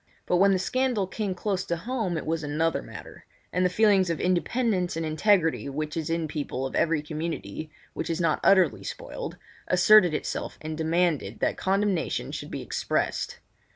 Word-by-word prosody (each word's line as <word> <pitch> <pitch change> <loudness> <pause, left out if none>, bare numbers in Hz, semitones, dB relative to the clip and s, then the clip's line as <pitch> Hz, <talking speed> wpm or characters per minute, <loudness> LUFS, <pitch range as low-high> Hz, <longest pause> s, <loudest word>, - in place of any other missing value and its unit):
But 180 - +2
when 195 +2 +5
the 190 - +3
scandal 245 +2 0
came 195 0 -3
close 190 0 -2
home 190 +1 -2
it - - -4
was 160 0 -1
another 155 +3 0
matter; - - -11 0.3
and 180 - +2
the 180 - +3
feelings 195 -2 +4
of 165 - -1
independence 185 0 0
and 165 - -2
integrity 165 -1 +2
which 150 +2 -4
is 160 -1 -3
in 165 -1 0
people 145 -3 -3
of 135 - -5
every 155 -2 +1
community 155 0 -5 0.2
which - - -4
is 165 0 -1
not 165 -3 +2
utterly 185 -5 +4
spoiled, - - -6 0.3
asserted 180 -1 +6
itself - - -4
and 155 0 -5
demanded 160 - 0
that - - +1
condemnation 195 -2 0
should - - -6
be - - -5
expressed. - - -2
170 Hz, 170 wpm, -27 LUFS, 155-195 Hz, 0.3 s, asserted